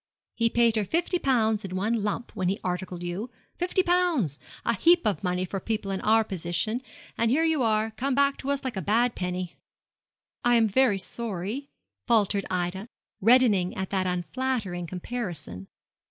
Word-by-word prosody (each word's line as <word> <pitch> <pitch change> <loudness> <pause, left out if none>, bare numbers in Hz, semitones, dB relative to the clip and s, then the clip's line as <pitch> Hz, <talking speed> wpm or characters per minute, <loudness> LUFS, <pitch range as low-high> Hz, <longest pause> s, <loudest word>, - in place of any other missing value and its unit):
He 230 0 +2
paid 235 -1 +3
her 215 - +2
fifty 345 - 0
pounds 225 -7 +2
in 185 -1 -5
one 215 +4 0
lump 210 +3 -3
when 185 -1 0
he 195 - -1
articled 180 -1 -3
you 180 +7 -4 0.3
fifty 360 +1 +1
pounds 345 - +1 0.3
a 235 - +2
heap 340 - +4
of 210 -1 0
money 180 0 0
for 195 +2 -4
people 210 -1 -3
in 190 - -2
our 220 +1 +4
position; 190 +4 -2 0.4
and 230 - +3
here 295 +7 +3
you 320 -3 +2
are, 220 -1 +1
come 260 +4 -1
back 280 0 +3
to 270 - -5
us 280 0 0
like 260 -4 -3
a 190 - -2
bad 230 +7 +2
penny.' 180 -1 -4 0.9
'I 240 0 +4
am 225 -1 +4
very 215 0 +3
sorry,' 225 +6 -4 0.4
faltered 205 -4 +3
Ida, 185 +3 -2 0.3
reddening 220 -5 +4
at 190 -1 -3
that 190 -2 0
unflattering 180 0 -2
comparison. 175 - -5
215 Hz, 170 wpm, -27 LUFS, 185-245 Hz, 0.9 s, heap